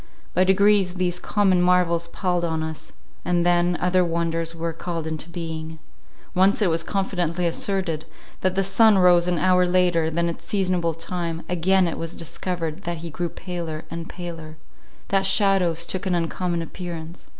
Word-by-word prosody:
By 185 Hz, -, +4 dB
degrees 195 Hz, -1 st, +3 dB
these 180 Hz, -1 st, -1 dB
common 190 Hz, -3 st, +2 dB
marvels 180 Hz, -2 st, +2 dB
palled 180 Hz, 0 st, -1 dB
on 160 Hz, -1 st, -1 dB
us, 160 Hz, -2 st, -7 dB, 0.3 s
and 175 Hz, -1 st, +1 dB
then 175 Hz, 0 st, +3 dB
other 180 Hz, 0 st, +2 dB
wonders 165 Hz, -1 st, -1 dB
were 165 Hz, 0 st, -3 dB
called 165 Hz, 0 st, -4 dB
into 160 Hz, +1 st, -5 dB
being. 160 Hz, -2 st, -6 dB, 0.6 s
Once 190 Hz, +2 st, +4 dB
it 200 Hz, -6 st, +2 dB
was 165 Hz, +1 st, +3 dB
confidently 180 Hz, -2 st, -1 dB
asserted, 170 Hz, -2 st, -1 dB, 0.3 s
that 185 Hz, 0 st, 0 dB
the 195 Hz, -, +2 dB
sun 210 Hz, +2 st, +5 dB
rose 175 Hz, -1 st, +5 dB
an 180 Hz, -1 st, +1 dB
hour 180 Hz, 0 st, +4 dB
later 175 Hz, -3 st, +2 dB
than 170 Hz, +1 st, 0 dB
its 170 Hz, -, -5 dB
seasonable 180 Hz, -5 st, 0 dB
time; 165 Hz, 0 st, -4 dB
again 180 Hz, +1 st, +2 dB
it 165 Hz, -, -4 dB
was 165 Hz, 0 st, -4 dB
discovered 165 Hz, 0 st, -4 dB
that 170 Hz, 0 st, -3 dB
he 165 Hz, -, -6 dB
grew 175 Hz, +3 st, -3 dB
paler 170 Hz, -4 st, -6 dB
and 165 Hz, 0 st, -6 dB
paler; 165 Hz, -3 st, -8 dB, 0.5 s
that 195 Hz, -1 st, +2 dB
shadows 190 Hz, -4 st, +2 dB
took 190 Hz, +3 st, -2 dB
an 180 Hz, -, +1 dB
uncommon 170 Hz, 0 st, -1 dB
appearance. 170 Hz, -1 st, -8 dB
175 Hz, 165 wpm, -23 LUFS, 165-185 Hz, 0.6 s, sun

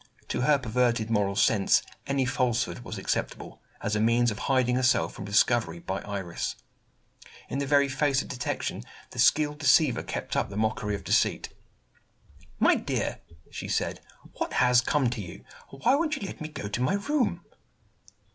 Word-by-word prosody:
To -, -, -1 dB
her 145 Hz, +3 st, +4 dB
perverted 120 Hz, -2 st, 0 dB
moral 100 Hz, -2 st, +1 dB
sense, 100 Hz, 0 st, +3 dB, 0.2 s
any 140 Hz, -1 st, +1 dB
falsehood 125 Hz, -1 st, 0 dB
was 115 Hz, -3 st, -7 dB
acceptable, 95 Hz, -, -3 dB, 0.2 s
as 105 Hz, -, 0 dB
a -, -, +1 dB
means 115 Hz, +2 st, +3 dB
of 105 Hz, -, -6 dB
hiding 130 Hz, -2 st, +3 dB
herself 130 Hz, 0 st, +2 dB
from 100 Hz, -, -8 dB
discovery 100 Hz, -3 st, +2 dB
by 95 Hz, +3 st, -4 dB
Iris. 95 Hz, -4 st, -4 dB, 0.9 s
In 135 Hz, -, -2 dB
the 140 Hz, -, -2 dB
very 140 Hz, 0 st, +4 dB
face 135 Hz, 0 st, +1 dB
of -, -, -11 dB
detection, 125 Hz, -, -3 dB, 0.3 s
the -, -, -8 dB
skilled 150 Hz, -1 st, +3 dB
deceiver 145 Hz, -3 st, +4 dB
kept -, -, -5 dB
up -, -, 0 dB
the 100 Hz, -, -7 dB
mockery 110 Hz, -1 st, -1 dB
of 100 Hz, -, -8 dB
deceit. -, -, +1 dB, 1.1 s
"My -, -, +5 dB
dear," -, -, -2 dB, 0.3 s
she -, -, -6 dB
said, -, -, -1 dB, 0.4 s
"what -, -, -2 dB
has 125 Hz, -1 st, +4 dB
come 135 Hz, +1 st, +1 dB
to 120 Hz, -3 st, -4 dB
you? 85 Hz, -3 st, -10 dB, 0.3 s
Why 135 Hz, -, +1 dB
won't 320 Hz, +2 st, +1 dB
you 250 Hz, -, -6 dB
let -, -, -8 dB
me 155 Hz, -, -3 dB
go 130 Hz, -9 st, -6 dB
to 105 Hz, +4 st, -3 dB
my 130 Hz, +10 st, +2 dB
room?" 255 Hz, +6 st, -1 dB
125 Hz, 170 wpm, -27 LUFS, 105-140 Hz, 1.1 s, My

